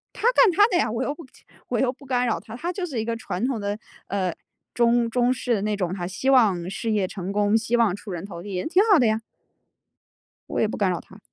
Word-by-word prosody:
他 460 - +2
干 475 - +6
他 410 +4 +6
的 370 - 0
呀， - - +1
我 230 +3 -2
又 285 +2 -1
不 330 - -11 0.4
我 - - -1
又 255 -2 +2
不 275 +1 -16
干 250 -1 +1
扰 230 - 0
他， 225 +1 -10
他 345 +7 -3
就 360 -1 -3
是 260 -8 -3
一 - - -2
个 230 0 -2
传 225 -1 -4
统 250 -5 -2
的， 205 +1 -3 0.3
呃， 185 -3 -1 0.4
中 235 0 +3
中 245 +1 +2
式 245 -1 -1
的 200 - -1
那 210 0 0
种 180 -3 -2
他 175 -2 -4
希 205 +9 -1
望 200 -10 +4
事 225 +3 -3
业 205 -3 +1
成 190 0 -5
功， 205 +1 +2
希 225 +2 +1
望 225 -6 +3
出 200 0 -9
人 175 0 -5
头 175 -4 -8
地， 200 0 -7
也 180 - -2
挺 370 +5 +4
好 370 - +7
的 245 - +4
呀。 220 +1 +1 1.3
我 - - -1
也 - - +3
不 215 - -4
干 200 -3 +1
扰 175 - -2
他。 195 - -16
225 Hz, 280 characters per minute, -24 LUFS, 200-255 Hz, 1.3 s, 好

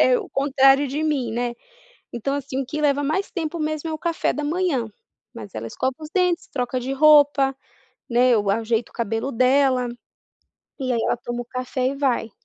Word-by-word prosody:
é - - +5
o 400 - -7
contrário 275 0 +4
de 285 +4 -3
mim, 280 -7 -1
né, 240 +1 -2 0.6
então 255 +4 -2
assim, 275 -1 -3
o - - -9
que 300 +4 -4
leva 285 -1 +2
mais 315 +8 -1
tempo 335 -2 -3
mesmo 310 0 -2
é - - -3
o 310 - -4
café 335 +1 -1
da 300 - -4
manhã, 310 -6 0 0.5
mas 105 -2 -10
ela 110 +1 -5
escova 260 - -2
os 310 -1 -9
dentes, 360 -2 +1
troca 250 -1 -2
de 255 +2 -4
roupa, 285 -2 +5 0.5
né, 245 +2 +4
eu 205 -2 +1
ajeito 225 +2 0
o - - -26
cabelo 225 +3 -2
dela, 255 0 +3 0.9
e 255 - -2
aí 235 - +1
ela - - +1
toma 240 0 -4
o - - -14
café 255 +1 -3
e 270 - -3
vai. 255 -5 0
270 Hz, 200 wpm, -23 LUFS, 245-300 Hz, 0.9 s, é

